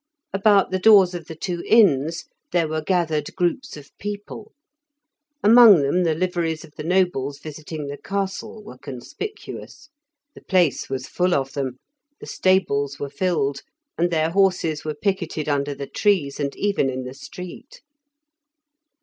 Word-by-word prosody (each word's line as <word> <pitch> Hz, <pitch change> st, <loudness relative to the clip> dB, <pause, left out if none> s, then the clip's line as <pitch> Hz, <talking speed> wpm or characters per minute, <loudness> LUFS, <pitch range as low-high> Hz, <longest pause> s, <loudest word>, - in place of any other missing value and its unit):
About 195 Hz, -1 st, +3 dB
the 185 Hz, -, 0 dB
doors 195 Hz, -3 st, +6 dB
of 170 Hz, -3 st, -7 dB
the 160 Hz, -, -8 dB
two 175 Hz, +1 st, -4 dB
inns 165 Hz, -, +3 dB, 0.3 s
there 170 Hz, -2 st, +2 dB
were 155 Hz, 0 st, -2 dB
gathered 160 Hz, -3 st, -1 dB
groups 180 Hz, -, -1 dB
of 145 Hz, -1 st, -14 dB
people; 205 Hz, +1 st, -7 dB, 0.9 s
among 215 Hz, -7 st, +8 dB
them 160 Hz, +7 st, +1 dB
the 165 Hz, -3 st, +1 dB
liveries 170 Hz, -2 st, -1 dB
of 150 Hz, -, -20 dB
the 150 Hz, -, -7 dB
nobles 165 Hz, -6 st, 0 dB
visiting 155 Hz, 0 st, -7 dB
the 140 Hz, 0 st, -7 dB
castle 200 Hz, +2 st, -4 dB
were 130 Hz, -10 st, -12 dB
conspicuous; 280 Hz, -, -8 dB, 0.4 s
the -, -, -14 dB
place 180 Hz, -7 st, +1 dB
was 130 Hz, -1 st, -3 dB
full 180 Hz, 0 st, 0 dB
of 135 Hz, -1 st, -2 dB
them, 130 Hz, -3 st, -3 dB, 0.4 s
the -, -, -10 dB
stables 145 Hz, -7 st, +1 dB
were 140 Hz, -1 st, -5 dB
filled, 140 Hz, -7 st, -1 dB, 0.3 s
and 175 Hz, +1 st, +1 dB
their 160 Hz, -1 st, +1 dB
horses 180 Hz, -5 st, +1 dB
were 155 Hz, -1 st, -4 dB
picketed 170 Hz, -3 st, -2 dB
under 145 Hz, -1 st, -1 dB
the 140 Hz, 0 st, -5 dB
trees 165 Hz, -7 st, 0 dB
and 140 Hz, -1 st, -2 dB
even 200 Hz, -9 st, 0 dB
in 130 Hz, 0 st, -4 dB
the 125 Hz, 0 st, -7 dB
street. 180 Hz, -, -10 dB
165 Hz, 150 wpm, -22 LUFS, 145-190 Hz, 0.9 s, among